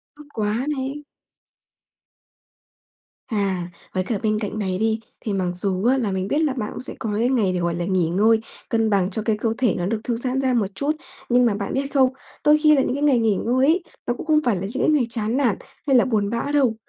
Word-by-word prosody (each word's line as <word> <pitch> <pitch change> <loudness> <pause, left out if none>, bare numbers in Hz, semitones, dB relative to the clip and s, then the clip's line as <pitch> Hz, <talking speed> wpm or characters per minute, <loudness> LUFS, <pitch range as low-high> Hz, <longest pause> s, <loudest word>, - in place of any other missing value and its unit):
Tốt 300 - -13
quá 215 +3 -1
này! 270 +3 -4 2.2
À, 195 -5 -1 0.2
với 185 - 0
cả 210 +2 -2
bên 215 0 +1
cạnh 215 0 -4
này 190 -3 -1
đi, 220 0 +1 0.2
thì 210 - -3
mặc 185 -2 0
dù 185 +2 -1
á 260 +2 +4
là 220 -6 -1
mình 190 0 -2
biết 290 +9 +1
là 290 - +1
bạn 225 -5 -3
cũng - - -7
sẽ - - -2
có 225 - -3
cái 240 +2 +2
ngày 220 -8 +2
để, 180 - -1
gọi 170 -1 -1
là, 175 0 -2
nghỉ 185 -2 +1
ngơi, 220 +6 +3 0.3
cân 225 -1 +1
bằng 195 -3 +2
cho 215 +2 -3
cái 215 -1 0
cơ 225 +1 0
thể 245 -5 +2
nó 175 - -1
được 215 +3 -1
thư 240 - -1
giãn 255 +2 -1
ra 260 -1 +1
một 220 -5 +2
chút. 285 +6 0 0.4
Nhưng 245 0 +4
mà 220 -4 +2
bạn 200 -1 -4
biết 275 +1 -2
không, 260 -2 +4 0.3
đôi 300 0 +6
khi 305 0 +5
là 270 - +3
những 250 - -1
cái 285 - -2
ngày 275 -5 +4
nghỉ 220 -3 +2
ngơi 255 +3 +3
ấy, 345 +3 +3 0.2
nó 240 - +2
cũng 245 - -8
không 310 -1 +4
phải 235 -5 +3
là 180 - -4
những 195 +4 -3
cái - - +3
ngày 295 -6 +3
chán 230 +1 -1
nản 240 -8 +2 0.3
hay 270 - +4
là 245 - +5
buồn 210 -5 0
bã 235 +5 -2
đâu. 265 -6 +3
225 Hz, 250 wpm, -22 LUFS, 200-260 Hz, 2.2 s, đôi